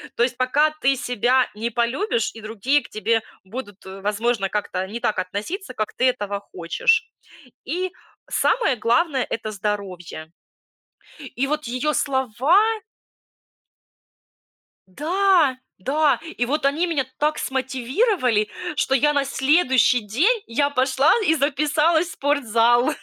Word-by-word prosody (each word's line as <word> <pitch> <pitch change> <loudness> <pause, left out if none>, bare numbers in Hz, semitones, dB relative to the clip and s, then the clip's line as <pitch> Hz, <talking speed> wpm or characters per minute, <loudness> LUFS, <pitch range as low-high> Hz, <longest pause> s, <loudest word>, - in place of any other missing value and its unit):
То - - -2
есть 245 - -1
пока 280 +5 +2
ты 270 0 +3
себя 250 +1 +1
не 230 +2 -3
полюбишь, 235 - 0
и 225 - -10
другие 230 +6 0
к - - -13
тебе 225 +1 0 0.2
будут, 205 -1 -9
э, 190 +1 -9
возможно, 210 0 0
как-то 190 -3 -2
не 230 +4 -6
так 215 - -1
относиться, 210 - -4
как 215 - -3
ты 255 - +2
этого 205 -4 -3
хочешь. 445 - +1 0.5
И 360 +6 -3 0.4
самое 455 - +2
главное- 260 +5 +1
это 220 -1 -4
здоровье. 190 -6 -5 0.9
И 270 -1 -3
вот 300 0 -2
её 255 +6 -1
слова 265 - +2 2.4
Да, 340 -4 +3 0.2
да, 285 +8 +1
и 320 -7 -3
вот 285 +2 -1
они 315 +6 +1
меня 285 -6 0
так 300 +1 +1
смотивировали, 260 - 0 0.3
что 270 -2 +1
я 295 +3 +3
на 280 -1 +1
следующий 265 -3 +3
день 320 - +1
я 285 +5 0
пошла 265 +1 +3 0.2
и 320 - +4
записалась 305 +4 +2
в - - -8
спортзал. 240 -4 +2
260 Hz, 130 wpm, -22 LUFS, 220-300 Hz, 2.4 s, и